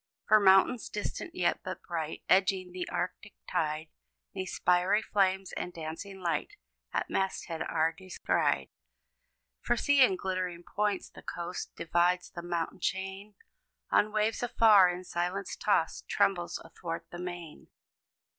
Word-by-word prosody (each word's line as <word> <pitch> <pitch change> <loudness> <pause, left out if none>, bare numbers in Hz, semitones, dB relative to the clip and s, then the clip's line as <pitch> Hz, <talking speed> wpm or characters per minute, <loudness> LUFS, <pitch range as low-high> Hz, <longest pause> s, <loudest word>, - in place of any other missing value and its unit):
For 215 - +7
mountains, 195 +4 +5
distant 210 - -5
yet, 175 - +1
but 185 -1 -6
bright, 160 -2 -4
Edging 185 -1 +3
the 180 0 -5
arctic 180 +3 -4
tide, 155 -2 -1 0.4
'Neath 185 -1 -4
spiry 180 +4 +2
flames 190 -1 +1
of 180 - -4
dancing 165 +5 -7
light, 165 -4 -1 0.4
At - - -1
masthead 190 -3 -2
are 160 0 +1
descried. 185 - 0 0.9
For 240 - +1
see! 285 +1 +5
in 195 -7 +4
glittering 185 -2 -3
points, 205 +1 -1
the - - -12
coast 175 +1 -5
Divides; 175 +2 +1
the 170 - -6
mountain 170 +1 -3
chain, 195 +3 -3 0.6
On 210 - +4
waves 215 +1 +1
afar 220 -6 +6
in 180 +1 -4
silence 180 +2 -2
tossed, - - 0
Trembles 175 -3 +1
athwart 165 0 -6
the 175 - -7
main. 175 -3 -7
185 Hz, 135 wpm, -30 LUFS, 175-195 Hz, 0.9 s, For